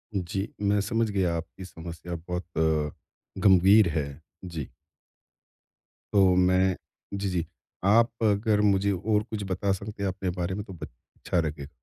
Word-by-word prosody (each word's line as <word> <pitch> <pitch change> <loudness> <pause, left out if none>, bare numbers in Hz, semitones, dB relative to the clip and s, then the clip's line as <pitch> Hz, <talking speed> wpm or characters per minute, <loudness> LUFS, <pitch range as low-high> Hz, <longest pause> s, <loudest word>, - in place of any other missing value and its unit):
जी, 95 +2 -2
मैं 100 0 +2
समझ 115 +2 0
गया 90 -4 +1
आपकी 90 +3 -7
समस्या 85 0 -7
बहुत, 90 +2 -5 0.9
गंभीर 95 +1 +6
है। 70 -2 -3 0.2
जी। 80 -6 -5 1.5
तो 95 -2 +5
मैं 90 0 +3 0.4
जी, 100 -1 -2
जी। 85 -2 -1 0.4
आप 115 +4 +5
अगर 105 0 +3
मुझे 100 -1 +3
और 105 +3 +1
कुछ 110 -3 -5
बता 95 +2 0
सकते 100 +1 -6
हैं - - +1
अपने 95 0 -3
बारे 95 +2 -1
में 105 - -4
तो 95 - -9
ब 85 - -7 0.3
अच्छा 90 - -1
लगे 75 -3 -4
95 Hz, 145 wpm, -27 LUFS, 90-100 Hz, 1.5 s, गंभीर